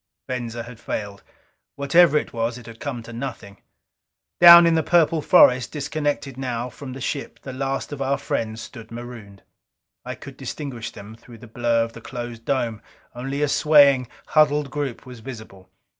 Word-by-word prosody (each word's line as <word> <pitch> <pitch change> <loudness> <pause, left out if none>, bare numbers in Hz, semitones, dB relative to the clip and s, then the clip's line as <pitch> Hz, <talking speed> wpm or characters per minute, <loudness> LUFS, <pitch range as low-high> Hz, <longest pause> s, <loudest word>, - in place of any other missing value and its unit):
Venza 120 -2 -4
had 120 -1 -12
failed. 100 -3 -5 0.5
Whatever 150 +2 +4
it - - -3
was, 115 +1 -2
it 120 - -12
had 115 -1 -12
come 130 -6 -5
to 115 - -11
nothing. 115 -5 -7 0.8
Down 170 0 +10
in 165 - +4
the 160 - +3
purple 165 0 +2
forest, 125 -3 +5
disconnected 145 -2 -3
now 125 -1 -3
from 130 0 -9
the 135 - -8
ship, 140 +2 -4
the 130 - -7
last 135 +2 -3
of 145 -2 -6
our 135 +1 0
friends 110 0 -3
stood 115 -3 -11
marooned. 115 -4 -10 0.6
I - - -6
could - - -12
distinguish 125 -6 -6
them 105 -1 -11
through 115 0 -15
the 115 - -13
blur 115 0 +1
of 115 0 -6
the 115 - -11
closed 120 -1 -7
dome 120 -6 -1 0.3
only 135 +4 -3
a - - +2
swaying, 140 -4 +5 0.2
huddled 150 -2 +3
group 145 -5 -4
was 125 -2 -11
visible. 110 -6 -11
125 Hz, 175 wpm, -23 LUFS, 115-140 Hz, 0.8 s, Down